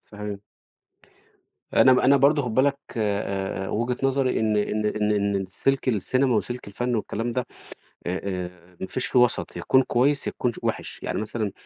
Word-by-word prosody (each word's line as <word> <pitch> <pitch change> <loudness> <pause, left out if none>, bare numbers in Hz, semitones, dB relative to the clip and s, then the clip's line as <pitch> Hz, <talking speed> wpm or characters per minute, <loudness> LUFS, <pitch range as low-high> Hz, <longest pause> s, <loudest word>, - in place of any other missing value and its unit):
صحيح. 105 -1 -7 1.4
أنا 130 - +6
م 125 - +4
أنا 135 +2 +5
برضه 145 +2 +4
خُد 120 -3 -4
بالك 140 +2 +2 0.2
آآ 100 -2 -2
آآ، - - -5
وجهة 120 +3 -1
نظري 135 -2 +1
إن 110 -1 +1
إن 105 +1 0
إن 105 0 0
إن 100 -1 0
السلك 100 +9 -1
السينما 130 +3 +2
وسلك 120 +3 -2
الفن 120 +4 -2
والكلام 115 +2 -3
ده 125 +1 -2 0.6
آآ 90 +1 -2 0.3
آآ، 90 0 -19
ما 95 - -3
فيش 130 - -2
فيه 125 - +2
وَسط، 125 0 +2
يا - - -5
تكون 130 - +4
كويس 140 +5 +2
يا - - -1
تكون 120 -2 -2
ش - - -7
وِحِش. - - -3
يعني - - -2
مثلًا 110 -2 -2
115 Hz, 185 wpm, -24 LUFS, 105-130 Hz, 1.4 s, أنا